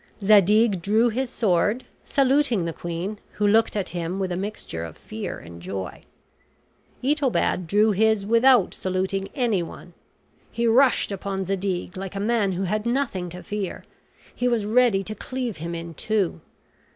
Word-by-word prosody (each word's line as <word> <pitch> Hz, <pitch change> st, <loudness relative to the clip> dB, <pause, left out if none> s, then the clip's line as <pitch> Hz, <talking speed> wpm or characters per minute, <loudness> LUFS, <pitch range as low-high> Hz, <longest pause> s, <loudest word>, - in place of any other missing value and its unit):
Zadig 205 Hz, 0 st, +5 dB
drew 220 Hz, +6 st, +3 dB
his 255 Hz, +3 st, -2 dB
sword, 210 Hz, +2 st, +1 dB, 0.2 s
saluting 270 Hz, -8 st, +2 dB
the 165 Hz, -, -3 dB
queen, 175 Hz, +6 st, -5 dB
who 210 Hz, -, -1 dB
looked 225 Hz, +2 st, +3 dB
at 200 Hz, -3 st, -1 dB
him 175 Hz, +1 st, -3 dB
with 190 Hz, -2 st, -2 dB
a -, -, -1 dB
mixture 190 Hz, -, -5 dB
of 80 Hz, -2 st, -8 dB
fear 215 Hz, -3 st, -6 dB
and 85 Hz, 0 st, -11 dB
joy. 95 Hz, +1 st, -6 dB, 1.0 s
Itobad 265 Hz, -, +1 dB
drew 210 Hz, +5 st, +4 dB
his 215 Hz, 0 st, +2 dB
without 230 Hz, -1 st, +4 dB
saluting 190 Hz, +1 st, -2 dB
anyone. 220 Hz, -, -2 dB, 0.6 s
He 235 Hz, +1 st, -1 dB
rushed 240 Hz, 0 st, +4 dB
upon 195 Hz, 0 st, -3 dB
Zadig, 190 Hz, -1 st, -2 dB
like 195 Hz, 0 st, -6 dB
a -, -, -2 dB
man 210 Hz, -2 st, +1 dB
who 185 Hz, +2 st, -2 dB
had 210 Hz, +4 st, -1 dB
nothing 235 Hz, -8 st, -1 dB
to 180 Hz, +1 st, -9 dB
fear; 205 Hz, -3 st, -4 dB, 0.5 s
he 245 Hz, -, -1 dB
was 235 Hz, -4 st, +1 dB
ready 220 Hz, -3 st, +3 dB
to 215 Hz, -, -5 dB
cleave 250 Hz, -2 st, -4 dB
him 170 Hz, +2 st, -5 dB
in 165 Hz, 0 st, -6 dB
two. 195 Hz, -1 st, -1 dB
205 Hz, 155 wpm, -24 LUFS, 180-230 Hz, 1.0 s, Zadig